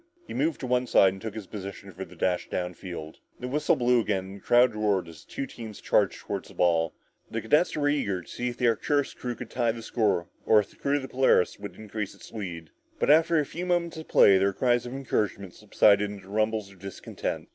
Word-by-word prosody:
He - - -8
moved 155 +3 0
to - - -3
one 125 0 +1
side 95 -4 +5
and 95 - -11
took 110 -2 -6
his 110 -3 -6
position 100 0 -8
for 95 +1 -7
the 90 -1 -13
dash 90 +1 -1
down 90 0 -2
field. 85 -3 -8 0.2
The 125 - -4
whistle 150 +4 +2
blew 125 0 +3
again 95 -4 -1
and 95 +1 -9
the - - -16
crowd 120 0 +4
roared 105 -4 0
as 80 -2 -12
the - - -31
two 135 - -3
teams 110 -5 -9
charged - - +2
toward - - -4
the - - -15
ball. 85 -2 +2 0.3
The 115 - -3
cadets 150 - +2
were 145 -1 +1
eager 100 - 0
to - - -21
see 125 - -4
if 120 - -7
the 125 - +2
Arcturus 145 +5 +1
crew 125 -1 -5
could 120 0 -9
tie 120 -2 +1
the 115 -1 -8
score 105 -7 +1 0.2
or 110 - +5
if 105 - -3
the - - -21
crew 140 +1 0
of 145 - -1
the - - -5
Polaris 130 -10 +2
would 100 0 -8
increase 105 -1 -5
its - - -14
lead. 85 -7 -6 0.3
But - - +3
after 165 +2 +5
a 150 - +1
few 175 +5 -5
moments 175 -1 0
of 160 - -8
play, 95 -1 +6
their 100 +1 +2
cries 120 +2 +1
of 120 - -7
encouragement 105 -8 -2
subsided 105 -1 +3
into 100 -2 -10
rumbles 110 -1 -1
of 95 - -18
discontent. 95 0 -5
110 Hz, 245 wpm, -27 LUFS, 95-125 Hz, 0.3 s, play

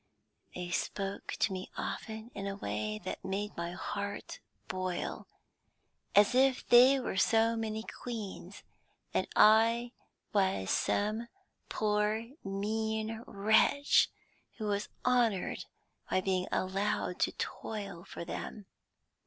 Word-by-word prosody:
They 180 -1 -4
spoke 195 +2 -2
to 195 - +1
me 185 0 -5
often 220 +1 -5
in 200 0 -4
a 195 - -3
way 105 - -3
that - - -5
made 200 +2 -3
my 170 0 -3
heart 200 +2 -5 0.3
boil, 185 -1 -3 0.9
as 205 +3 +6
if 260 0 +3
they 255 +3 +8
were 245 -6 -3
so 225 +3 +4
many 220 -1 -3
queens, 225 -5 -7 0.5
and - - +1
I 230 +2 +5 0.4
was 190 - +2
some 215 +3 +1 0.4
poor 210 +1 +1 0.2
mean 220 +3 -2
wretch 220 +8 +4 0.5
who 220 - -4
was 205 0 -1 0.2
honoured 240 -6 +2 0.4
by - - +2
being 185 -1 0
allowed 190 -1 -1
to - - +2
toil 200 -5 -5
for 170 - -7
them. 205 +4 -6
210 Hz, 115 wpm, -32 LUFS, 190-225 Hz, 0.9 s, they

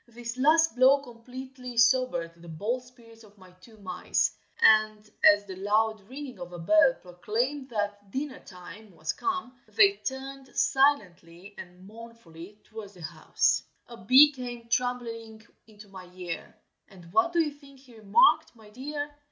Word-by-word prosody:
This 235 0 -7
last 310 +2 +3
blow 260 +3 +5
completely 250 +1 -10
sobered 230 -8 +2
the 170 - -13
bold 210 +10 -3
spirits 235 -3 -18
of 210 -1 -20
my 185 -1 -17
two 220 +3 -17
mice, 195 -3 -1 0.2
and 215 -1 +4 0.2
as 205 0 +6
the 190 -2 -8
loud 215 +2 0
ringing 270 -1 -8
of 175 0 -8
a - - -7
bell 265 - +4
proclaimed 235 +10 -3
that 205 -2 -4
dinner 265 +4 -5
time 185 +2 -13
was 160 +1 -3
come, 365 - -4
they 400 0 +4
turned 270 -2 -7
silently 195 -9 0
and 180 +1 -12
mournfully 210 -4 -13
towards 215 -2 -11
the 175 - -13
house. 155 0 0 0.3
A 235 - -9
bee 265 +8 +7
came 240 -3 -8
tumbling 230 -2 -3 0.2
into 210 -1 -15
my 185 -2 -12
ear, 175 -2 -7 0.3
And 175 -2 -16
what 225 +9 +3
do 345 - 0
you 310 -3 +1
think 280 -2 -18
he 250 -4 -18
remarked, 215 +2 +3
my 215 -2 -17
dear? 290 +5 -6
230 Hz, 155 wpm, -27 LUFS, 200-260 Hz, 0.3 s, bee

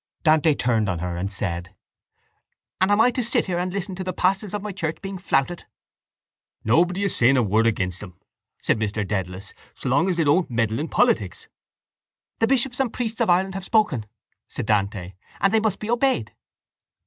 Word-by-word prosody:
Dante 155 -1 +4
turned 115 -6 +1
on 90 - -1
her 90 +1 -3
and 95 +3 -3
said: 90 -3 -3 1.1
—And 185 - +4
am 205 +1 +3
I 245 +3 +5
to 250 - -2
sit 235 - +1
here 175 -2 -2
and 180 +1 -2
listen 195 0 -4
to 185 +1 -5
the 185 0 -3
pastors 190 +3 0
of 210 -1 -4
my 210 - -4
church 165 -4 -3
being 195 -1 -6
flouted? 175 -1 0 1.0
—Nobody 175 - +2
is 200 - 0
saying 130 +3 +4
a 125 - +3
word 110 +2 +2
against 95 -5 -1
them, 90 -4 -11 0.4
said - - 0
Mr 105 -1 -2
Dedalus, 95 -1 -4 0.2
so 130 - -4
long 145 +9 +3
as 180 - -1
they 165 - +3
don't 155 +5 +2
meddle 115 -1 0
in 155 - -2
politics. 100 - 0 0.9
—The 225 - +3
bishops 260 0 +1
and 260 -4 +1
priests 230 -1 -3
of 230 - +2
Ireland 190 +2 +2
have 195 -1 -5
spoken, 190 - +1 0.4
said - - -5
Dante, 100 -3 -1 0.3
and 195 +1 +2
they 220 - +5
must 215 -3 0
be 210 - -6
obeyed. 240 - +1
160 Hz, 195 wpm, -23 LUFS, -, 1.1 s, I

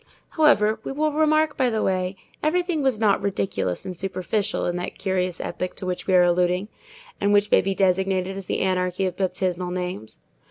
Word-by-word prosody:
However, 220 -9 +3
we - - -4
will 305 +2 0
remark 310 0 +2
by 255 -2 +2
the 220 -2 -1
way, 185 0 0 0.3
everything 345 0 0
was 265 -5 +1
not 210 -3 +3
ridiculous 195 - -2
and 185 - -5
superficial 195 +3 -2
in 175 - -1
that 180 - -5
curious 185 -2 -1
epoch 185 - -4
to - - -7
which 180 -1 -4
we 190 - +3
are 180 - +7
alluding, 180 +3 +1 0.5
and 200 0 +2
which 205 0 +3
may - - +6
be 195 +1 -2
designated 190 0 +1
as 195 -2 -7
the - - -1
anarchy 185 0 0
of 185 -2 -2
baptismal 185 -1 -1
names. 180 - -5
190 Hz, 190 wpm, -24 LUFS, 180-215 Hz, 0.5 s, are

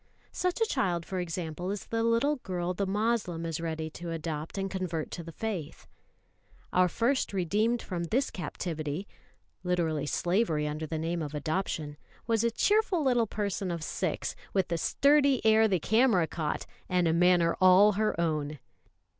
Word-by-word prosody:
Such 360 +2 -1
a 450 - +4
child, 180 - 0
for 185 - -3
example, 175 0 -4
is 205 0 -4
the 225 0 -1
little 230 +6 +2
girl 180 -6 -3
the 195 +2 -2
Moslem 200 -5 0
is 165 0 -3
ready 160 -1 -3
to 170 +2 -7
adopt 160 0 -4
and 195 0 -1
convert 180 -5 -3
to 170 - -5
the 165 - -8
faith. 190 -5 -5 0.9
Our 180 0 +5
first 235 - 0
redeemed 210 +6 +1
from 175 -3 -3
this 255 +11 0
captivity 160 0 -4 0.6
(literally 165 -5 0
slavery 175 -3 +1
under 155 +1 -4
the 160 - -3
name 165 +2 -2
of 150 -1 -5
adoption) 155 -1 -2 0.3
was 225 -1 +1
a 235 - +3
cheerful 405 - +2
little 245 -4 +3
person 200 -2 -2
of 170 -2 -3
six, - - -2 0.2
with 190 -2 +2
the 170 - 0
sturdy 280 - +4
air 220 0 +6
the 190 -4 +1
camera 220 -1 +3
caught, 160 -1 -3 0.2
and 180 -2 +2
a 160 - +2
manner 175 -1 +4
all 185 +3 +7
her 215 -3 0
own. 155 -3 -1
180 Hz, 165 wpm, -29 LUFS, 165-220 Hz, 0.9 s, all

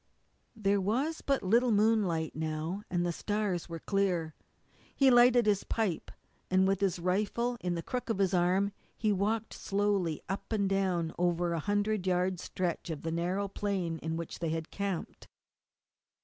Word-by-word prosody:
There 200 -2 +1
was 260 - 0
but 275 -5 0
little 235 +6 +3
moonlight 205 -7 +2
now, 160 +4 -3
but 175 -1 0
the 175 - 0
stars 200 -1 -2
were 165 - -4
clear. 180 -3 0 0.6
He 270 -2 +5
lighted 245 -1 +6
his 205 -2 +2
pipe, 215 -7 -1 0.4
and 185 +1 +4
with 195 -1 +1
his 190 -3 +1
rifle 210 +7 0
in 180 -1 -1
the 170 - -4
crook 250 -1 -4
of 225 - 0
his 195 -1 +1
arm 185 +3 +2 0.3
he 215 -1 +1
walked 215 +3 -1
slowly 195 -5 0
up 195 +4 -5
and 205 -3 +1
down 185 -4 0
over 175 -1 +1
a 165 - -1
hundred 205 +2 0
yard 180 0 +1
stretch 180 -1 -3
of 155 -3 -5
the 165 - -2
narrow 180 +4 -1
plain 190 -5 -2
in 160 0 -3
which 170 -1 -6
they 165 - -1
had 160 0 -3
camped. 200 -4 -4
190 Hz, 165 wpm, -31 LUFS, 175-210 Hz, 0.6 s, lighted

